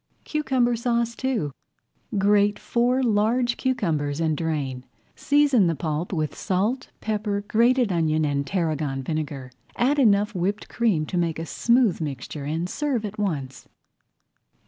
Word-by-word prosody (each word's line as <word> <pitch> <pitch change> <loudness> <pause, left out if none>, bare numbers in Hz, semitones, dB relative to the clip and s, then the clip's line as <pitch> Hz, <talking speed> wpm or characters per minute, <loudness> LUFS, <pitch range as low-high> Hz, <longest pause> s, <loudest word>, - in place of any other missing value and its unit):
CUCUMBER 260 -5 +1
SAUCE 235 0 0
II 235 - 0 0.7
Grate 205 +1 +3
four 245 +2 +1
large 235 +2 +2
cucumbers 165 - -1
and 160 -2 +1
drain. 145 -6 -2 0.3
Season 285 -9 +3
the 165 - 0
pulp 155 +3 -3
with 155 -5 -2
salt, 210 +7 -1
pepper, 210 -2 -1
grated 240 0 +3
onion, 155 -2 +1
and 140 -1 -1
tarragon 155 -6 -1
vinegar. 140 -3 -4 0.2
Add 280 +4 +2
enough 210 -3 +3
whipped 195 +3 -2
cream 210 -10 +1
to 180 - -2
make 165 -2 0
a 165 - -4
smooth 235 - +2
mixture 140 0 -5
and 160 +4 -2
serve 265 -1 -1
at 210 +1 -7
once. 145 -10 -3
200 Hz, 135 wpm, -24 LUFS, 155-235 Hz, 0.7 s, Grate